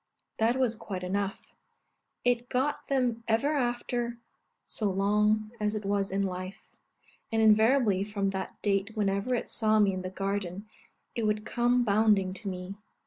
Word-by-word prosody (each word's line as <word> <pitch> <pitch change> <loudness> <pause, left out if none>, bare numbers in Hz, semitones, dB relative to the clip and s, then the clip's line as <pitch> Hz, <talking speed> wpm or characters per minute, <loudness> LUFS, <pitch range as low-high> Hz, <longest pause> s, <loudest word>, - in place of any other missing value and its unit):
That 225 +2 +3
was 255 -3 +1
quite 190 -4 -6
enough; 195 +2 -3 0.7
it 245 0 +1
got 265 +4 -1
them 250 -4 0
ever 230 +7 +2
after, 240 -2 -1 0.5
so 210 -3 0
long 210 +2 +2
as 210 0 0
it 210 -1 -4
was 200 0 0
in 200 +1 0
life; 185 +2 -6 0.6
and 225 - +1
invariably 220 -1 +4
from 200 -1 -1
that 190 0 -5
date 205 +2 0
whenever 200 +4 +1
it 235 - -3
saw 215 -1 +2
me 205 -2 +4
in 185 - -3
the 185 - -4
garden, 195 0 -3 0.5
it 230 -3 -1
would 210 0 -1
come 245 0 +2
bounding 205 -3 +3
to 200 +1 -5
me. 180 +1 -6
210 Hz, 155 wpm, -29 LUFS, 195-235 Hz, 0.7 s, invariably